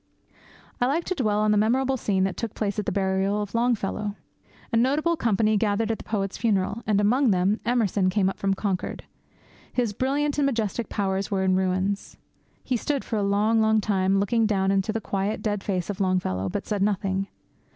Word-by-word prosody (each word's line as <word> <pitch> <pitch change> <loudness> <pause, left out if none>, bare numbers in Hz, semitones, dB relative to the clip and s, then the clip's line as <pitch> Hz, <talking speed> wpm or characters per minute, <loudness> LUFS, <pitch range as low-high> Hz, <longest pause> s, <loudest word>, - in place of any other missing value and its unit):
I 245 - +4
like 315 +6 0
to 370 - -2
dwell 215 - 0
on 215 0 +3
that 210 - +3
memorable 260 +5 +2
scene 195 -6 0
that 190 -1 -1
took 230 -3 -5
place 205 -1 -2
at 210 - -4
the - - +1
burial 195 +1 0
of 205 -1 -4
Longfellow. 215 -3 0 0.6
A - - 0
notable 285 +8 +2
company 215 -5 +2
gathered 215 +1 +1
at 225 - -3
the - - -9
poet's 195 -3 -3
funeral; 210 -1 0
and, 210 -2 +3
among 245 +6 +3
them, 195 +2 +2
Emerson 210 -6 +2
came 190 0 +1
up 195 - -3
from 195 0 +1
Concord. 190 -2 -3 0.7
His 240 -4 0
brilliant 285 +5 0
and 280 - +3
majestic 230 -3 -2
powers 195 -1 -1
were 195 -2 0
in 185 0 +3
ruins. 190 +1 -1 0.5
He 255 - 0
stood 280 +3 -2
for 225 - -2
a - - 0
long, 210 +3 +2
long 220 0 +3
time 195 -2 +1
looking 225 +2 +2
down 195 -2 +1
into 195 +2 +1
the 225 +1 -3
quiet, 200 +1 -2
dead 205 -2 -1
face 185 -4 -2
of 200 -1 -4
Longfellow, 140 - 0
but - - -4
said 205 -2 -2
nothing. 195 -1 0
205 Hz, 200 wpm, -25 LUFS, 195-230 Hz, 0.7 s, I